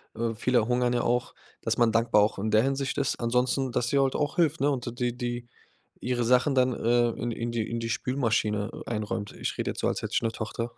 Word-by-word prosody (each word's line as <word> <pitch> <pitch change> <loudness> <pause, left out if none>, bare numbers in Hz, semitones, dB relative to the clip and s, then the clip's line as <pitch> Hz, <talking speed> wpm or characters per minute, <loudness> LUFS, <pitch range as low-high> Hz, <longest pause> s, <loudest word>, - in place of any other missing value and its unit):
äh, 115 0 -1
viele 120 0 +1
hungern 125 0 +1
ja 120 - +1
auch, 120 0 0 0.3
dass - - -1
man 120 -2 +4
dankbar 115 -1 +3
auch 105 -1 -1
in 110 +2 -1
der 110 +1 +5
Hinsicht 135 0 -1
ist. 140 -3 0
Ansonsten, 125 +2 +1
dass 120 0 0
sie 140 - +2
halt 135 -1 +2
auch 145 +2 -1
hilft, 165 -2 +2
ne, 145 - +3
und 120 -3 -4
die 120 -1 0
die 120 -1 -4 0.6
ihre 125 -1 0
Sachen 125 +4 +3
dann, 130 0 +3
ähm, 120 0 +2
in 120 - -2
in 115 +1 -3
die 115 -2 -2
in 115 - -2
die 115 0 -3
Spülmaschine, 110 -4 0
äh, - - -8
einräumt. 105 -1 -3
Ich - - -4
rede - - -1
jetzt - - -6
so, - - +1
als - - -1
hätte - - -5
ich - - +3
'ne 115 - +1
Tochter. 115 +1 -4
120 Hz, 245 wpm, -27 LUFS, 115-125 Hz, 0.6 s, der